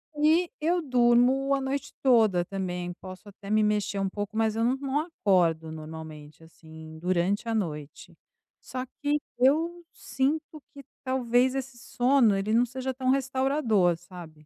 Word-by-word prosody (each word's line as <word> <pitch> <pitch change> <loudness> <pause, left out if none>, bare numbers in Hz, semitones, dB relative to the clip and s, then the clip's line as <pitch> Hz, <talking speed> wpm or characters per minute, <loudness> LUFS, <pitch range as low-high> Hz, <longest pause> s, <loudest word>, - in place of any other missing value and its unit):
E 320 +4 +3
eu 345 +3 +1
durmo 255 0 +3
a 275 - +1
noite 270 +1 -3
toda 220 -9 +4
também, 180 -1 -4
posso 185 +2 -11
até 200 0 -12
me 215 0 +3
mexer 210 -1 0
um 195 0 0
pouco, 205 +2 -5
mas 220 -1 +1
eu 225 - 0
não 245 +3 +2
não 275 +1 -1
acordo 180 - +1
normalmente, 155 -1 -10
assim, 160 -1 -13
durante 185 +5 0
a 230 - -1
noite. 150 -8 -5 0.5
Só 255 0 -5 0.2
que 295 0 +1 0.2
eu 325 +7 +2
sinto 305 +3 -2
que, 280 - -11 0.2
talvez, 255 0 +1
esse 270 -2 -5
sono 245 -2 +2
ele 200 +3 -1
não 235 +2 +4
seja 260 +2 -4
tão 260 0 -2
restaurador, 260 - +2
sabe. 165 -3 -13
230 Hz, 155 wpm, -27 LUFS, 180-270 Hz, 0.5 s, toda